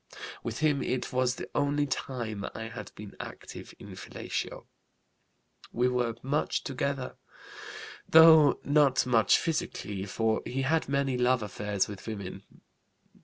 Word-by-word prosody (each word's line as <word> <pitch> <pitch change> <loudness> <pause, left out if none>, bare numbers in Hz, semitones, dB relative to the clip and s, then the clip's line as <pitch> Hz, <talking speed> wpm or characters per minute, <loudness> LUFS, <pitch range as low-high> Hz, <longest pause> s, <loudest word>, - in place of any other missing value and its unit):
With 115 +4 -5
him 150 -3 +2
it 130 0 -2
was 125 0 +1
the - - -7
only 145 0 +1
time 120 -6 -4
I 115 0 -5
had 115 - -8
been 105 -1 -10
active - - -9
in - - -12
fellatio. - - -5 1.1
We 125 +2 +2
were 120 -2 0
much 140 +3 0
together, 135 -1 -3 0.9
though 160 -2 +8
not 140 -3 +3
much 115 -3 +4
physically, 155 - -3
for 110 +2 0
he 135 +2 -3
had 160 +3 +1
many 140 -2 0
love 125 -1 +2
affairs 105 -1 -1
with 100 0 -9
women. 100 -3 -6
125 Hz, 130 wpm, -29 LUFS, 110-140 Hz, 1.1 s, though